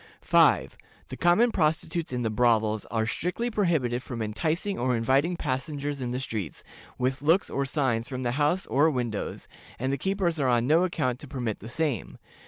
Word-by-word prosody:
"5. - - +3 0.3
The - - -6
common 195 +8 +4
prostitutes 160 -1 0
in 125 -1 -2
the 110 - 0
brothels 110 -2 +2
are 110 0 -1
strictly 180 - -2
prohibited 155 - +1
from 125 -2 -6
enticing 155 - -2
or 125 0 +1
inviting 135 +9 +2
passengers 145 0 -3
in 125 - -2
the 125 +1 -2
streets, 110 - -5 0.3
with 130 +2 -1
looks 165 +6 +2
or 140 0 -1
signs 130 -5 0
from 130 -2 -5
the 120 - 0
houses 150 +7 +1
or 145 +4 +3
windows, 120 -7 -3 0.3
and 130 +3 -1
the 140 - -2
keepers 190 -3 0
are 135 -2 +2
on 120 -1 +2
no 160 +6 +4
account 130 -8 -1
to 145 - -9
permit 125 -6 -3
the 110 - -9
same. 140 - -2
135 Hz, 185 wpm, -27 LUFS, 120-160 Hz, 0.3 s, common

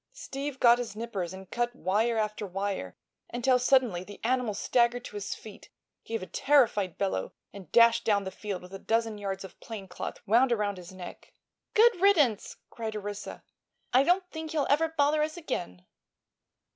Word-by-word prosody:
Steve 280 - -6
got 240 0 +6
his 235 -4 -5
nippers 210 -6 -4
and 190 0 -11
cut 240 0 -1
wire 225 +2 +1
after 215 -1 -1
wire 195 - -4 0.3
until 250 +1 +2
suddenly 250 -8 +3
the 205 +1 -11
animal 245 -3 0
staggered 240 +3 +1
to - - -9
his 205 0 -4
feet, 215 -2 -13 0.4
gave 225 -4 -3
a - - -4
terrified 210 - +2
bellow 190 - -2 0.2
and 190 -5 -11
dashed 235 0 +6
down 205 -2 +2
the 190 - -5
field 195 -1 -5
with 180 +1 -12
a 195 - -6
dozen 225 -1 0
yards 195 -1 -4
of 190 - -12
plane 215 -4 -8
cloth 180 - -6
wound 240 +5 +4
around 205 -4 0
his 180 -1 -10
neck. 185 -2 -10 0.4
"Good 445 -4 +5
riddance!" 300 - +3 0.2
cried 220 -2 -5
Orissa. 205 0 -6 0.5
"I 255 - +7
don't 360 +5 +2
think 320 0 -6
he'll 295 -3 +1
ever 315 +3 +4
bother 300 -1 +2
us 310 +2 -1
again." 135 - -5
225 Hz, 175 wpm, -29 LUFS, 195-260 Hz, 0.5 s, I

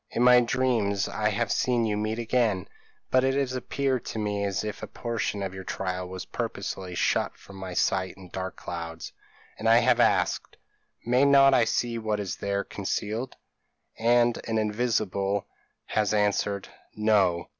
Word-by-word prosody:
In 120 - 0
my 125 0 +8
dreams 115 -5 +1
I 105 0 0
have 110 +1 -1
seen 120 -2 +1
you 105 -1 0
meet 110 +1 -2
again; 115 -5 0 0.4
but 130 0 +4
it 135 0 +2
has 135 -2 0
appeared 130 0 -1
to - - -5
me 105 -1 -1
as 100 0 -1
if 105 -1 -5
a - - -5
portion 110 -4 -3
of 95 -1 -4
your 95 0 -7
trial 90 -1 -3
was 95 0 -6
purposely 90 -2 -4
shut - - 0
from 100 - -13
my 95 -2 -6
sight 95 0 +1
in 95 -2 -12
dark 95 +1 -5
clouds; 85 -1 -7 0.5
and 115 - +1
I 115 - +7
have - - +3
asked, - - +1 0.5
'May 125 +3 +3
not 135 -1 +6
I 120 -3 +5
see 115 +1 -1
what 110 -1 -1
is 100 -3 -4
there 100 0 -1
concealed?' 105 +5 -3 0.6
and 120 +1 +3
an 115 -1 0
invisible 105 -3 0 0.4
has 105 -1 0
answered, 100 -1 0 0.3
'No! 100 -5 +2
105 Hz, 165 wpm, -27 LUFS, 95-120 Hz, 0.6 s, my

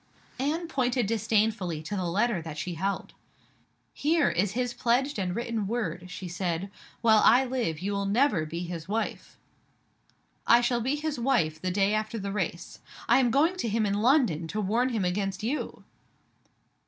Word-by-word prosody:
Anne 315 +6 -1
pointed 250 -5 0
disdainfully 210 -6 0
to 185 +6 -4
the 185 -2 -2
letter 200 +2 +1
that 160 -2 -7
she 175 +3 -3
held. 195 +4 -3 0.8
"Here 310 0 +2
is 190 +4 0
his 245 +1 -1
pledged 250 +2 +1
and 180 -1 -2
written 230 -3 -2
word," 185 -6 -3
she 185 0 -6
said. 175 +1 -3 0.3
"While 220 -2 +5
I 250 +4 +6
live, 245 -11 -1
you 200 +2 -2
will 200 0 -1
never 210 - +2
be 170 +3 -4
his 170 -1 -6
wife." 220 +3 -3 1.1
"I 235 - +7
shall 240 0 +1
be 260 +5 0
his 300 -2 -3
wife 165 -12 +1
the 185 - -1
day 195 +2 +2
after 215 +1 -1
the 200 -2 -4
race. 180 -3 -4 0.3
I - - +5
am 250 -2 +3
going 315 +9 +2
to 235 - -2
him 215 +1 +1
in 200 - 0
London 230 - +3
to 210 +6 -3
warn 225 +6 +1
him 220 -6 -1
against 195 +2 -2
You!" 265 +7 -3
215 Hz, 175 wpm, -28 LUFS, 180-245 Hz, 1.1 s, I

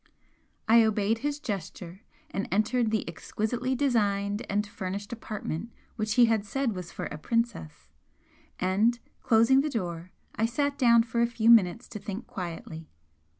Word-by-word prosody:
I 230 +1 +7
obeyed 220 0 +1
his 290 +2 -2
gesture, 190 - -6 0.3
and 195 - -3
entered 225 +3 +2
the 220 -1 -1
exquisitely 235 +9 -2
designed 205 -5 +1
and 205 +1 0
furnished 200 +2 -5
apartment 215 -3 -5 0.3
which 215 -2 -1
he 245 - +7
had 225 -3 +1
said 240 +3 -1
was 180 -3 -7
for - - -5
a 150 - -6
'princess,' 230 -8 -2 0.7
and 205 +6 +2 0.2
closing 230 +4 +4
the 305 - -1
door 175 - -4 0.2
I 225 - +1
sat 285 +4 -1
down 235 -3 +6
for 235 0 -1
a 235 - +4
few 235 -1 +3
minutes 225 0 +4
to 210 - -7
think 205 +4 -6
quietly. 165 -3 -7
220 Hz, 150 wpm, -28 LUFS, 195-235 Hz, 0.7 s, I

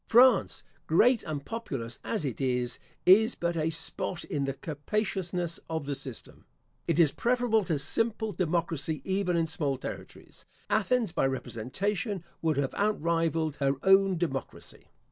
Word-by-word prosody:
France, 250 +2 +5 0.2
great 230 +9 +4
and 145 -3 -4
populous 135 - -5
as 210 -9 -2
it 130 -1 -3
is, 125 -2 0 0.3
is 220 +6 +6
but 170 0 -1
a 160 0 +1
spot 165 +2 -4
in 140 -2 -2
the 135 0 -2
capaciousness 175 +3 -2
of 160 -3 -2
the 145 - -2
system. 130 -3 -9 0.4
It 165 -3 +1
is 165 -4 +5
preferable 240 -1 +2
to 160 -5 0
simple 220 +9 -1
democracy 165 -3 -1
even 190 -2 0
in 165 - +2
small 150 -4 -1
territories. - - -9 0.3
Athens, 245 -7 +2
by 135 - +1
representation, 175 - -3 0.2
would 160 -3 +1
have 140 -2 0
outrivalled 165 -6 0
her 135 -1 +2
own 195 -1 +5
democracy. 155 -6 -5
165 Hz, 145 wpm, -29 LUFS, 145-200 Hz, 0.4 s, is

